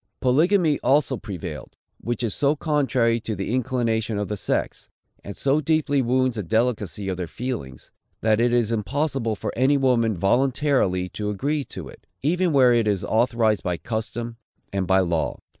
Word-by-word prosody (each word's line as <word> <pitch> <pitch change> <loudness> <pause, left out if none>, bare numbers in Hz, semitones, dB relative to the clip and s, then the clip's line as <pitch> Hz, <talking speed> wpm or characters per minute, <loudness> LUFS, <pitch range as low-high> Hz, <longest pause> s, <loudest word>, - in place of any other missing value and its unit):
Polygamy 155 +4 +3
also 135 0 +2
prevailed; 90 - -7 0.2
which 120 +1 -3
is 110 -4 -1
so 145 +1 +2
contrary 135 -7 +1
to 110 -1 -4
the 95 +4 -3
inclination 115 -4 0
of 105 -1 -2
the 105 - -1
sex, 100 - -3 0.3
and 100 - -8
so 140 +2 +2
deeply 150 -2 +1
wounds 130 0 +1
the - - -1
delicacy 105 -1 -1
of 95 -2 -2
their 90 -2 -3
feelings, 110 - -6 0.3
that 110 0 +2
it 120 +1 +3
is 120 -2 +2
impossible 125 +1 -1
for - - -4
any 135 +4 +3
woman 120 -6 +2
voluntarily 120 - +1
to 105 +3 -4
agree 140 +8 -1
to - - -9
it, - - -15 0.2
even 175 +4 +2
where 130 -4 +5
it 115 -2 +2
is 100 -3 0
authorized 115 -2 +2
by 90 -1 -2
custom 115 +5 -4 0.4
and 95 -2 -1
by 95 +1 +4
law. 85 -3 -1
115 Hz, 170 wpm, -23 LUFS, 105-135 Hz, 0.4 s, where